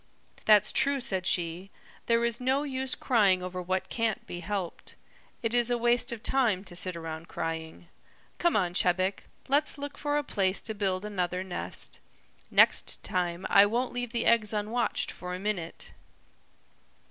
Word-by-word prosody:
"That's 210 -1 +6
true," 280 +1 +3
said 190 -8 -1
she. 175 +2 -1 0.4
"There 235 0 +3
is 235 +1 -1
no 265 +3 +1
use 265 -2 -2
crying 200 -7 +2
over 180 0 -4
what 185 +1 -2
can't 225 -3 -1
be 175 - -7
helped. 185 -1 -5 0.5
It 225 0 0
is 240 -1 +4
a 245 - +1
waste 240 +1 +1
of 235 -1 -6
time 230 -8 +2
to 185 -3 -10
sit 180 0 -2
around 165 0 -7
crying. 165 +1 -5 0.5
Come 345 -1 +2
on, 180 -4 +1
Chebec, 185 +1 0 0.2
let's 290 +3 +2
look 285 0 -7
for 290 0 0
a 295 - 0
place 195 -7 +2
to 220 - +1
build 195 -2 -1
another 180 -3 -2
nest. 185 -2 -6 0.5
Next - - +4
time 175 0 -2
I 200 +1 +6
won't 245 +4 -1
leave 245 -1 -3
the 235 -1 -1
eggs 220 -2 +3
unwatched 215 +3 -1
for 180 0 -6
a - - -6
minute." 190 -5 -4
205 Hz, 165 wpm, -28 LUFS, 180-240 Hz, 0.5 s, That's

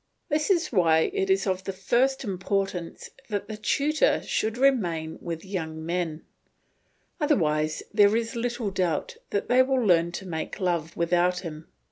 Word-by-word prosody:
This 300 +3 0
is 355 -3 +2
why 165 -6 +3
it 390 -1 -1
is 385 -6 +3
of 185 -1 -1
the - - -2
first 245 +8 +1
importance 195 -3 -3 0.2
that 205 -1 -2
the 215 - -5
tutor 295 - +1
should 220 +2 -1
remain 175 -13 +1
with 170 +1 -5
young 160 -5 -4
men; 170 -2 -2 1.0
otherwise 155 - +1
there 205 0 +5
is 230 0 -1
little 235 -2 -2
doubt 180 -5 -1
they 245 +5 +3
will 260 -2 +1
learn 170 -3 +4
to 190 - -6
make 160 -3 -5
love 170 -4 -1
without 175 +1 +2
him. 160 -3 -8
190 Hz, 150 wpm, -26 LUFS, 170-240 Hz, 1.0 s, there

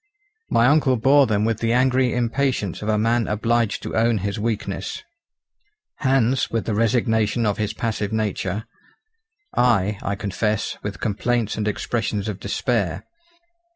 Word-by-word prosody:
My 115 - +3
uncle 135 -2 +4
bore 135 +4 +5
them 105 -1 +1
with 115 -1 0
the 115 0 +1
angry 130 0 +3
impatience 120 -4 -1
of 105 - -3
a 105 - +2
man 115 +1 +1
obliged 115 +1 0
to - - -5
own 115 0 +3
his 100 +1 -3
weakness; 105 -3 -3 0.9
Hans 130 -2 +2
with 115 -1 -2
the 110 - -1
resignation 110 0 +1
of 105 -1 0
his 105 -1 0
passive 110 -3 -2
nature; 105 -1 -2 0.9
I, 105 -5 +2
I 100 - -2
confess, 105 +1 -2
with 100 -2 -5
complaints 115 +1 0
and 105 -1 -2
expressions 105 -1 -2
of 105 -3 -4
despair. 100 -4 -1
110 Hz, 145 wpm, -22 LUFS, 105-120 Hz, 0.9 s, bore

